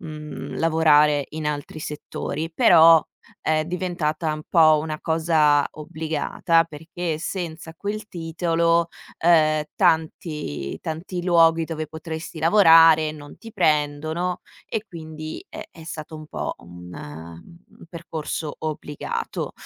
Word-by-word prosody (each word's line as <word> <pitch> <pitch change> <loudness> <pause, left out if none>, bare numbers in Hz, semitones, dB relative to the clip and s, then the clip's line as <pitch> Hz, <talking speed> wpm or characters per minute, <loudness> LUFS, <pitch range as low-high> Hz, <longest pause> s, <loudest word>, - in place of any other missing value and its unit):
mhmm, 150 -2 -7
lavorare 150 -3 +4
in 155 -1 -5
altri 150 +1 -4
settori, 150 +1 -5
però 165 -1 +7 0.4
è 155 0 +1
diventata 170 -3 -2
un 155 0 -6
po' 155 -2 +5
una 155 -1 -4
cosa 160 -3 +3
obbligata 160 +1 0
perché 160 +1 -5
senza 165 -1 -5
quel 210 +2 -5
titolo, 170 0 0 0.3
ehm, 155 -2 +4
tanti 160 - -1
tanti 170 +3 -5
luoghi 165 -2 +4
dove 155 -1 -4
potresti 160 +1 -7
lavorare 165 -3 +6
non 145 -1 -12
ti 225 -1 -12
prendono 155 +4 0 0.3
e 220 -1 -3
quindi, 155 -2 -8
eh, - - -9
è 160 - -13
stato 155 -1 -7
un 155 0 -10
po' - - -4
un 90 0 -12 0.9
un - - -13
percorso 160 -2 -5
obbligato. 150 -2 -4
160 Hz, 115 wpm, -23 LUFS, 155-165 Hz, 0.9 s, però